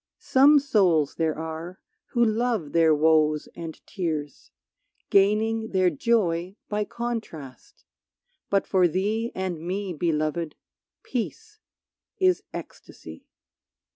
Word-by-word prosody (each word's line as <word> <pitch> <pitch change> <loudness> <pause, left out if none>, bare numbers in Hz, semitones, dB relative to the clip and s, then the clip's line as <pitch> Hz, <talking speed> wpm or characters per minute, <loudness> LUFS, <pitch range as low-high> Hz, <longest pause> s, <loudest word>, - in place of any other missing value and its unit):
Some 280 +3 +5
souls 190 - +2
there 160 -2 -1
are 160 +3 -6 0.3
who 235 -1 +2
love 220 -8 0
their 165 -2 +4
woes 155 0 +3
and 165 -2 -7
tears, 155 -7 -4 0.6
Gaining 220 +3 +2
their 185 -1 +3
joy 180 -1 0
by 210 0 -1
contrast, 215 - -7 0.6
but 200 -1 +2
for 185 -2 +3
thee 210 +7 -1
And 185 -3 -3
me, 185 +2 -3
Beloved, 155 0 -1 0.5
peace 425 - -5 0.6
is 370 -1 +3
ecstasy. - - -10
185 Hz, 105 wpm, -25 LUFS, 160-225 Hz, 0.6 s, Some